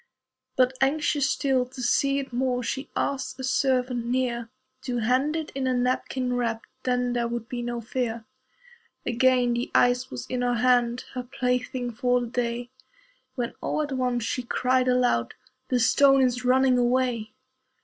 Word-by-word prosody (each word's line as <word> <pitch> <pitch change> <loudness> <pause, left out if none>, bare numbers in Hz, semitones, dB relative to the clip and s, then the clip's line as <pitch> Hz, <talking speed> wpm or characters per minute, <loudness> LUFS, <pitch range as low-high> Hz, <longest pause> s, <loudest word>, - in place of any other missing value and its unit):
But, 255 0 +3
anxious 290 0 +2
still 265 -2 +1
to 255 0 -9
see 275 +3 +2
it 275 -3 -4
more, 250 0 0
She 265 +4 -4
asked 270 -1 -2
a - - -5
servant 255 -2 +1
near 240 -2 -1 0.3
To 245 -2 -3
hand 255 +7 +1
it 320 -2 -4
in 265 -1 -2
a 255 - +1
napkin 250 0 -1
wrapped 230 -2 -1 0.2
Then 250 -1 +1
there 240 -1 0
would 235 -1 -4
be 245 -1 -4
no 240 0 -3
fear. 230 -1 -3 0.8
Again 250 0 +3
the 240 +1 -2
ice 245 +1 +3
was 125 - -6
in 250 -1 -3
her 245 0 +1
hand, 245 0 +2
Her 255 - -3
plaything 250 -1 -2
for 245 +2 +1
the 245 - -3
day, 240 0 -3 0.6
When 240 -3 -3
all 305 - -1
at 290 - -5
once 250 -2 0
she 250 - -2
cried 255 +1 +1
aloud, 250 - +1 0.3
"The 255 -1 +1
stone 270 +3 +5
is 250 -1 0
running 255 0 +4
away." 245 -3 0
250 Hz, 165 wpm, -26 LUFS, 240-260 Hz, 0.8 s, stone